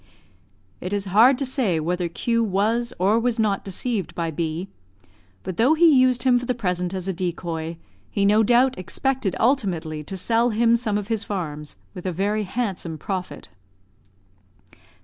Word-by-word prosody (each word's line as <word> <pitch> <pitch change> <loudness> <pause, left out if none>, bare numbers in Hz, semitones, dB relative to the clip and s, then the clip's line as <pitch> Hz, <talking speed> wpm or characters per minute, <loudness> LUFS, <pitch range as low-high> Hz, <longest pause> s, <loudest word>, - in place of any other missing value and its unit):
It 185 +2 -5
is 200 -1 -1
hard 245 +5 +6
to 275 - -2
say 245 - 0
whether 175 +2 -1
Q 230 +7 0
was 225 +4 0
or 200 +5 +3
was 240 0 0
not 210 -3 0
deceived 195 -3 -3
by 165 -1 -2
B; 165 +3 -3 0.8
but 185 - -5
though 260 +8 +4
he 320 -2 +6
used 255 -2 +3
him 250 -2 +4
for 245 - -7
the 250 - 0
present 180 -4 -2
as 185 0 -4
a 190 - -1
decoy, 170 -2 -4 0.3
he 200 - 0
no 210 +2 +5
doubt 245 +3 +3
expected 255 +2 -1
ultimately 180 - 0
to 190 - -5
sell 230 +5 +2
him 230 +1 +3
some 225 -3 -1
of 210 +1 -5
his 225 -2 0
farms, 150 -8 -5 0.2
with 185 -1 -6
a - - 0
very 205 +4 -1
handsome 190 -6 -3
profit. 185 +3 -5
205 Hz, 170 wpm, -23 LUFS, 180-235 Hz, 0.8 s, hard